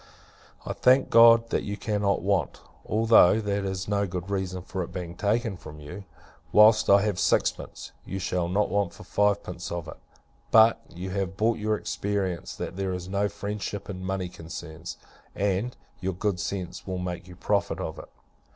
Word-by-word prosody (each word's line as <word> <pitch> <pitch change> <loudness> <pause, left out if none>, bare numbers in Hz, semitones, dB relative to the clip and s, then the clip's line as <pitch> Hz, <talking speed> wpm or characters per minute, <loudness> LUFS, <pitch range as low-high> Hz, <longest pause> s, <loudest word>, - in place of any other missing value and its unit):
I - - -3
thank 130 +1 +4
God, 115 0 +7
that - - +1
you 105 0 -4
cannot 105 -4 0
want; 100 -2 0 0.3
(although 110 -2 +5
that 100 -2 -1
is 95 -1 -3
no 100 -1 +1
good 90 +1 -5
reason 95 -2 -2
for 95 0 -4
its - - -8
being 90 -2 -5
taken 105 +1 0
from 75 -3 -11
you:) 75 +7 -9 0.5
whilst 105 +1 +6
I 100 0 +6
have 105 -4 -1
sixpence, - - 0
you 95 - -5
shall 90 -2 -1
not 100 +3 +1
want 100 -4 0
for - - -12
fivepence 105 0 -1
of 85 -2 -4
it! 80 - -9 0.5
But, 110 0 +6
you 90 +2 -6
have 95 -1 -3
bought 115 +1 +1
your 105 0 +1
experience, 100 -5 -3
that 90 - -6
there 95 -1 -1
is 90 0 -5
no 100 +1 0
friendship 105 0 -5
in 95 -1 -7
money 95 -1 -2
concerns; 85 -1 -8 0.4
and, 100 +5 -1 0.2
your 95 +1 -2
good 95 0 -1
sense 95 +1 -5
will 95 -1 -3
make 90 -1 -5
you 90 - -11
profit 95 -1 0
of 80 -3 -5
it. - - -11
95 Hz, 180 wpm, -27 LUFS, 90-105 Hz, 0.5 s, God